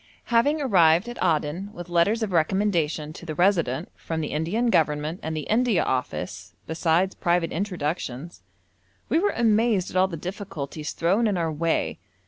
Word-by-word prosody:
Having 285 Hz, +7 st, +3 dB
arrived 175 Hz, -5 st, +4 dB
at 240 Hz, -, -4 dB
Aden 170 Hz, +3 st, 0 dB
with 175 Hz, -1 st, -8 dB
letters 180 Hz, +7 st, +2 dB
of 210 Hz, -, -2 dB
recommendation 165 Hz, -3 st, 0 dB
to -, -, -11 dB
the 155 Hz, -2 st, -5 dB
Resident 170 Hz, -5 st, +1 dB
from 165 Hz, -1 st, -4 dB
the 155 Hz, -, -2 dB
Indian 200 Hz, +11 st, 0 dB
Government 155 Hz, +1 st, +1 dB
and 160 Hz, 0 st, -3 dB
the -, -, -2 dB
India 225 Hz, -, +2 dB
Office, 95 Hz, -8 st, -3 dB
besides 165 Hz, -, +1 dB
private 170 Hz, -1 st, 0 dB
introductions, 165 Hz, -5 st, -4 dB, 0.7 s
we 320 Hz, -, +3 dB
were 410 Hz, +3 st, +1 dB
amazed 220 Hz, -4 st, +2 dB
at -, -, -11 dB
all 185 Hz, +1 st, +4 dB
the 170 Hz, -3 st, -6 dB
difficulties 160 Hz, -5 st, -6 dB
thrown 195 Hz, +8 st, +2 dB
in 200 Hz, -3 st, 0 dB
our 165 Hz, -2 st, 0 dB
way. 165 Hz, +2 st, -1 dB
170 Hz, 160 wpm, -25 LUFS, 155-205 Hz, 0.7 s, arrived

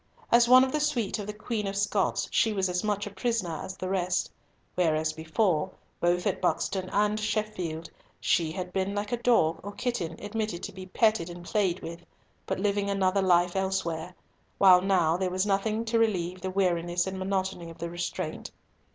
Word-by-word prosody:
As 235 Hz, 0 st, +6 dB
one 255 Hz, +1 st, +9 dB
of 265 Hz, -, 0 dB
the 305 Hz, -, 0 dB
suite 240 Hz, -9 st, 0 dB
of 205 Hz, -, -5 dB
the -, -, -2 dB
Queen 210 Hz, -1 st, -3 dB
of 195 Hz, -, -3 dB
Scots, 200 Hz, 0 st, 0 dB
she 225 Hz, -, +2 dB
was 190 Hz, -2 st, 0 dB
as 180 Hz, +2 st, -1 dB
much 205 Hz, -1 st, -1 dB
a 205 Hz, -, -6 dB
prisoner 190 Hz, -5 st, -2 dB
as 190 Hz, -, -7 dB
the 185 Hz, -, -4 dB
rest; 185 Hz, -1 st, 0 dB, 0.4 s
whereas 160 Hz, -3 st, +1 dB
before, 160 Hz, +1 st, 0 dB, 0.3 s
both 175 Hz, +1 st, +1 dB
at -, -, 0 dB
Buxton 185 Hz, +1 st, 0 dB
and 210 Hz, +1 st, +1 dB
Sheffield, 210 Hz, -7 st, -2 dB, 0.3 s
she 165 Hz, -2 st, +1 dB
had 180 Hz, 0 st, -5 dB
been 195 Hz, +1 st, -1 dB
like 205 Hz, 0 st, -3 dB
a 240 Hz, -, +1 dB
dog 180 Hz, -10 st, +3 dB
or 205 Hz, -, -6 dB
kitten 235 Hz, -11 st, -2 dB
admitted 210 Hz, -3 st, -3 dB
to -, -, -4 dB
be 185 Hz, 0 st, -9 dB
petted 215 Hz, -3 st, +2 dB
and 175 Hz, 0 st, -9 dB
played 190 Hz, -2 st, 0 dB
with, 170 Hz, +1 st, -7 dB, 0.4 s
but -, -, -2 dB
living 200 Hz, 0 st, 0 dB
another 195 Hz, 0 st, +2 dB
life 175 Hz, -1 st, +3 dB
elsewhere, 180 Hz, -3 st, -2 dB, 0.4 s
while 185 Hz, -2 st, +7 dB
now 180 Hz, -4 st, +2 dB
there 185 Hz, 0 st, 0 dB
was 185 Hz, +2 st, 0 dB
nothing 215 Hz, +3 st, 0 dB
to 230 Hz, 0 st, +1 dB
relieve 185 Hz, -5 st, 0 dB
the 190 Hz, -, -3 dB
weariness 175 Hz, -2 st, +1 dB
and 190 Hz, 0 st, -4 dB
monotony 190 Hz, -2 st, -2 dB
of 165 Hz, -, -11 dB
the 170 Hz, 0 st, -5 dB
restraint. 175 Hz, 0 st, -4 dB
190 Hz, 190 wpm, -28 LUFS, 175-210 Hz, 0.4 s, one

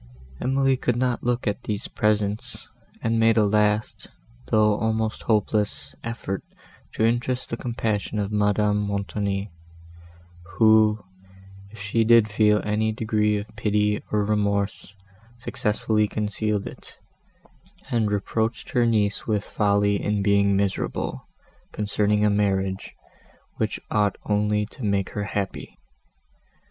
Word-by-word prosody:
Emily 135 Hz, +1 st, +2 dB
could 125 Hz, -2 st, 0 dB
not 125 Hz, 0 st, 0 dB
look 120 Hz, 0 st, -1 dB
at 105 Hz, +4 st, -1 dB
these 105 Hz, -2 st, -3 dB
presents, 105 Hz, 0 st, -1 dB, 0.4 s
and 115 Hz, 0 st, +1 dB
made 115 Hz, 0 st, +4 dB
a 110 Hz, -, +5 dB
last, 105 Hz, +1 st, +1 dB, 0.4 s
though 105 Hz, +6 st, +3 dB
almost 110 Hz, 0 st, -1 dB
hopeless, 105 Hz, -9 st, 0 dB
effort 115 Hz, -4 st, -4 dB, 0.5 s
to 110 Hz, -, +1 dB
interest 120 Hz, +2 st, -1 dB
the -, -, 0 dB
compassion 110 Hz, -4 st, -2 dB
of 100 Hz, -1 st, -1 dB
Madame 105 Hz, 0 st, +2 dB
Montoni, 100 Hz, 0 st, -2 dB, 1.0 s
who, 110 Hz, 0 st, +4 dB, 0.6 s
if 110 Hz, +1 st, -14 dB
she 105 Hz, +3 st, +1 dB
did 115 Hz, -1 st, +6 dB
feel 105 Hz, 0 st, +3 dB
any 110 Hz, +1 st, 0 dB
degree 110 Hz, -1 st, +1 dB
of 105 Hz, +1 st, -7 dB
pity, 105 Hz, -1 st, +1 dB
or 105 Hz, -1 st, +1 dB
remorse, 100 Hz, -1 st, -1 dB, 0.4 s
successfully 105 Hz, -2 st, 0 dB
concealed 105 Hz, 0 st, -2 dB
it, -, -, -10 dB, 0.9 s
and 115 Hz, -3 st, +1 dB
reproached 110 Hz, +2 st, -2 dB
her 120 Hz, -1 st, +3 dB
niece 105 Hz, -3 st, +1 dB
with 105 Hz, -2 st, 0 dB
folly 100 Hz, -1 st, +1 dB
in 105 Hz, -1 st, 0 dB
being 100 Hz, 0 st, +3 dB
miserable, 100 Hz, -1 st, -2 dB, 0.4 s
concerning 105 Hz, 0 st, +1 dB
a -, -, +4 dB
marriage, 95 Hz, -2 st, -1 dB, 0.6 s
which -, -, -1 dB
ought 105 Hz, -2 st, +1 dB
only 105 Hz, 0 st, +1 dB
to 120 Hz, +4 st, -12 dB
make 100 Hz, -2 st, 0 dB
her 105 Hz, -, -3 dB
happy. 100 Hz, -1 st, -4 dB
105 Hz, 125 wpm, -24 LUFS, 100-110 Hz, 1.0 s, did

